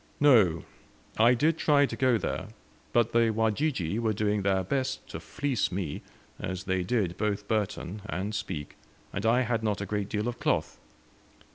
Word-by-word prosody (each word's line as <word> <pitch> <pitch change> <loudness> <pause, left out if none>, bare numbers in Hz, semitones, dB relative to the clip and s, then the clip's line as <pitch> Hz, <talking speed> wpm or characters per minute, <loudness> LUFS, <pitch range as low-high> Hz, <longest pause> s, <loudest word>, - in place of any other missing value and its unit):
"No; 110 - +5 0.6
I 120 +3 +6
did 155 +6 +2
try 145 -2 +4
to - - -5
go 130 -3 +3
there, - - -3 0.4
but 120 -1 +2
the 115 -1 +4
Wajiji 110 - 0
were 110 -2 +1
doing 105 0 0
their 95 -1 +1
best 130 +7 -2
to - - -6
fleece 140 -8 -1
me, 90 -5 -3 0.4
as 95 0 -4
they 95 -2 0
did 90 -3 -1
both 105 -1 -1
Burton 105 -2 -2
and 100 +4 -3
Speke, 95 -8 -4 0.4
and 100 +2 -1
I 120 +3 +4
had 115 -2 0
not 105 -2 -1
a 100 - -3
great 105 -1 -2
deal 105 +2 -1
of 120 0 -4
cloth. - - 0
105 Hz, 170 wpm, -28 LUFS, 100-120 Hz, 0.6 s, I